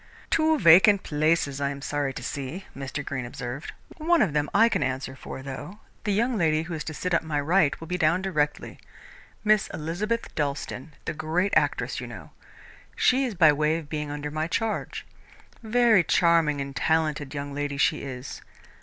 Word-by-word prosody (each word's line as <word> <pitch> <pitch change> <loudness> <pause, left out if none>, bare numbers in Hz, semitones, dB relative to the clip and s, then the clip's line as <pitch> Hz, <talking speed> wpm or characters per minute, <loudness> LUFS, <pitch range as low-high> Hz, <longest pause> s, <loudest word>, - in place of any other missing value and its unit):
"Two 315 0 +3
vacant 195 - +6
places, 150 -2 0
I 140 - +1
am 140 0 -6
sorry 145 -1 -1
to - - -8
see," 145 +7 -5
Mr. 135 +1 -5
Greene 125 -2 -4
observed. 125 +3 -6 0.3
"One 330 -2 +3
of 170 -9 -1
them 150 -1 0
I 225 +3 +5
can - - 0
answer 130 0 -2
for, 130 - -8
though. 145 +8 -7 0.3
The 210 - +1
young 230 +4 +1
lady 155 -2 +2
who 170 +1 -7
is 155 - -4
to 160 - -5
sit 180 +3 -2
on 170 - +2
my 150 -2 0
right 160 +1 +2
will 165 - -8
be 180 +2 -3
down 165 +4 +2
directly 150 -6 -2 0.6
Miss 215 -1 +3
Elizabeth 200 +9 -3
Dalstan, 145 0 -3
the - - -2
great 160 +5 -1
actress, - - +1
you - - -6
know. - - -10 0.6
She 265 +2 +3
is 235 -5 -4
by 160 -4 +6
way 155 +2 +1
of 155 -3 -9
being 150 -1 -3
under 145 0 -5
my 155 +1 -2
charge. 220 +5 -2 0.6
Very 230 -4 +4
charming 165 -4 +3
and 140 0 -6
talented 155 -3 0
young 140 0 -5
lady 145 0 -3
she 140 - +2
is. 130 -1 -7
155 Hz, 185 wpm, -26 LUFS, 145-190 Hz, 0.6 s, vacant